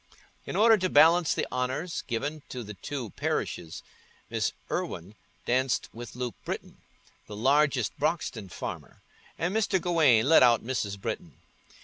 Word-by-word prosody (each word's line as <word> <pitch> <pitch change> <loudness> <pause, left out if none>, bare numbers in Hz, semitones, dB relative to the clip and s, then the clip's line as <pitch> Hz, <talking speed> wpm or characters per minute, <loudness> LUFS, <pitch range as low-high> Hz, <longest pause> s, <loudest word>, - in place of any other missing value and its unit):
In - - -4
order 225 +1 +6
to 185 0 0
balance 165 +2 +5
the - - 0
honours 130 +7 -2
given 145 +5 -3
to 125 -2 -5
the 105 -1 -8
two 115 +3 -6
parishes, 80 -2 -3 0.5
Miss - - 0 0.2
Irwine 90 +5 -3 0.3
danced 130 0 +1
with 120 0 -9
Luke 125 -1 -3
Britton, - - -6 0.5
the 105 - -8
largest 135 -1 +2
Broxton 145 - -1
farmer, - - -7 0.3
and 175 +5 -1
Mr. 205 -3 +2
Gawaine 155 -10 +4
led 160 - +7
out 120 -3 +5
Mrs. 105 -6 -2
Britton. - - -5
130 Hz, 140 wpm, -28 LUFS, 115-160 Hz, 0.5 s, led